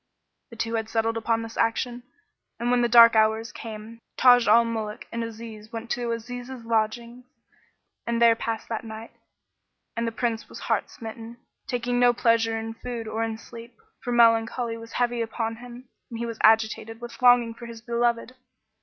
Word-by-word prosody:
The 230 Hz, -, -12 dB
two 230 Hz, 0 st, -3 dB
had 225 Hz, -1 st, -2 dB
settled 225 Hz, 0 st, 0 dB
upon 225 Hz, 0 st, 0 dB
this 225 Hz, 0 st, -9 dB
action; 240 Hz, +2 st, 0 dB, 0.6 s
and 240 Hz, +1 st, 0 dB
when 245 Hz, 0 st, +3 dB
the 240 Hz, -, +2 dB
dark 230 Hz, 0 st, +8 dB
hours 220 Hz, +1 st, +2 dB
came 225 Hz, 0 st, -9 dB, 0.2 s
Taj 245 Hz, -2 st, +6 dB
al 230 Hz, +2 st, +6 dB
Muluk 220 Hz, -2 st, -4 dB
and 230 Hz, 0 st, -3 dB
Aziz 220 Hz, -1 st, -9 dB
went 230 Hz, +1 st, -6 dB
to 240 Hz, -1 st, -1 dB
Aziz's 245 Hz, +1 st, -6 dB
lodgings 235 Hz, +2 st, -2 dB, 0.8 s
and 235 Hz, 0 st, 0 dB
there 230 Hz, -1 st, +6 dB
passed 225 Hz, -1 st, -4 dB
that 225 Hz, 0 st, -4 dB
night, 220 Hz, 0 st, -9 dB, 0.8 s
and 230 Hz, 0 st, -1 dB
the -, -, -1 dB
Prince 230 Hz, -1 st, -2 dB
was -, -, -10 dB
heart -, -, -1 dB
smitten, 230 Hz, -2 st, -9 dB, 0.3 s
taking 245 Hz, 0 st, -1 dB
no 245 Hz, 0 st, +5 dB
pleasure 230 Hz, -1 st, +2 dB
in 225 Hz, 0 st, -5 dB
food 230 Hz, -1 st, -6 dB
or 220 Hz, +1 st, -3 dB
in 225 Hz, -1 st, -3 dB
sleep; 230 Hz, +1 st, -12 dB, 0.3 s
for 245 Hz, -, -3 dB
melancholy 230 Hz, 0 st, +3 dB
was 230 Hz, 0 st, -11 dB
heavy 240 Hz, -1 st, 0 dB
upon 225 Hz, 0 st, -3 dB
him 245 Hz, +1 st, -11 dB, 0.2 s
and 230 Hz, -, -6 dB
he 235 Hz, -, -3 dB
was 230 Hz, -1 st, -6 dB
agitated 220 Hz, 0 st, +3 dB
with 240 Hz, +1 st, -10 dB
longing 245 Hz, -2 st, +5 dB
for 235 Hz, +1 st, -10 dB
his 230 Hz, -1 st, -9 dB
beloved. 235 Hz, +1 st, 0 dB
230 Hz, 180 wpm, -25 LUFS, 225-240 Hz, 0.8 s, dark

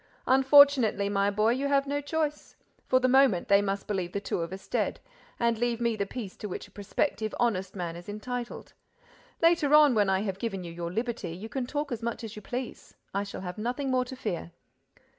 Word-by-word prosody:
"Unfortunately, 265 Hz, -6 st, +5 dB
my 200 Hz, 0 st, +2 dB
boy, 215 Hz, +2 st, +2 dB
you 265 Hz, +3 st, 0 dB
have 280 Hz, -1 st, +2 dB
no 285 Hz, +1 st, -2 dB
choice. 300 Hz, 0 st, -3 dB, 0.3 s
For 255 Hz, -, +4 dB
the 255 Hz, -, +2 dB
moment, 260 Hz, -8 st, +4 dB
they 200 Hz, 0 st, +6 dB
must 200 Hz, 0 st, -2 dB
believe 185 Hz, -4 st, -3 dB
the 200 Hz, -, -1 dB
two 200 Hz, -, -3 dB
of 165 Hz, +1 st, -4 dB
us 190 Hz, 0 st, -8 dB
dead—and 235 Hz, -, -2 dB
leave 240 Hz, -1 st, 0 dB
me 235 Hz, -1 st, +1 dB
the 200 Hz, -2 st, -2 dB
peace 210 Hz, -4 st, -6 dB
to 210 Hz, -, -6 dB
which -, -, -6 dB
a -, -, -23 dB
prospective 215 Hz, +2 st, -2 dB
honest 195 Hz, -6 st, 0 dB
man 175 Hz, -3 st, -4 dB
is 175 Hz, +3 st, -10 dB
entitled. 240 Hz, +3 st, -6 dB, 0.7 s
Later 330 Hz, -3 st, +5 dB
on, 300 Hz, -3 st, +7 dB
when 205 Hz, -3 st, +3 dB
I 190 Hz, 0 st, +2 dB
have 195 Hz, -2 st, -3 dB
given 195 Hz, -5 st, -3 dB
you 170 Hz, -, -7 dB
your 170 Hz, 0 st, -5 dB
liberty, 225 Hz, -5 st, -3 dB
you 210 Hz, +5 st, -8 dB
can 255 Hz, +1 st, -3 dB
talk 290 Hz, +1 st, -3 dB
as 235 Hz, -2 st, -3 dB
much 235 Hz, 0 st, -3 dB
as 220 Hz, -2 st, -7 dB
you 210 Hz, -, -8 dB
please—I 235 Hz, -4 st, -6 dB
shall 200 Hz, -, -7 dB
have 180 Hz, +2 st, -6 dB
nothing 250 Hz, +5 st, -2 dB
more 255 Hz, -1 st, +2 dB
to 260 Hz, -, -8 dB
fear." 195 Hz, -9 st, -4 dB
225 Hz, 210 wpm, -28 LUFS, 200-260 Hz, 0.7 s, on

